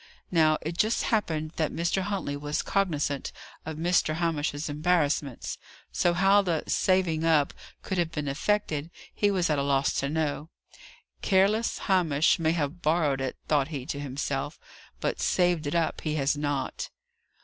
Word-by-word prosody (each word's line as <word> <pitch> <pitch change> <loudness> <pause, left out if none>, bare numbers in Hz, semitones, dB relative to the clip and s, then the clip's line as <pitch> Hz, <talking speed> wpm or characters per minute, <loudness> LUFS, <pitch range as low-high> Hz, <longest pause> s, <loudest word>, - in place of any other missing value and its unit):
Now, 155 -3 +4
it 165 +2 -5
just 220 +2 +2
happened 160 -8 0
that 155 -2 0
Mr. 170 +3 0
Huntley 190 -7 -2
was 145 +1 -2
cognizant 150 -8 -1 0.4
of 160 -1 -4
Mr. 170 -1 +2
Hamish's 160 -3 -1
embarrassments; 150 -4 0 0.3
so, 175 - +2
how 195 +3 +5
the 170 -5 -1
"saving 180 -4 +1
up" 155 -3 +3 0.3
could 190 -2 -2
have 170 -2 0
been 150 -3 -3
effected, 155 0 -1 0.2
he 205 - +2
was 185 -3 +1
at 150 - +1
a - - +1
loss 140 0 +1
to 140 - -1
know. 155 0 -2 0.7
"Careless 205 +4 +2
Hamish 165 -7 +3
may 160 0 +2
have 160 +1 -2
borrowed 150 -4 +1
it," 130 -1 -3
thought 145 -3 +2
he 140 -5 -5
to 140 -1 -4
himself, 140 +1 -3 0.4
"but - - -2
saved 175 -4 +2
it 145 - -2
up 165 -2 0
he 155 -1 -2
has 140 0 +1
not." 145 -2 -2
160 Hz, 160 wpm, -27 LUFS, 145-175 Hz, 0.7 s, how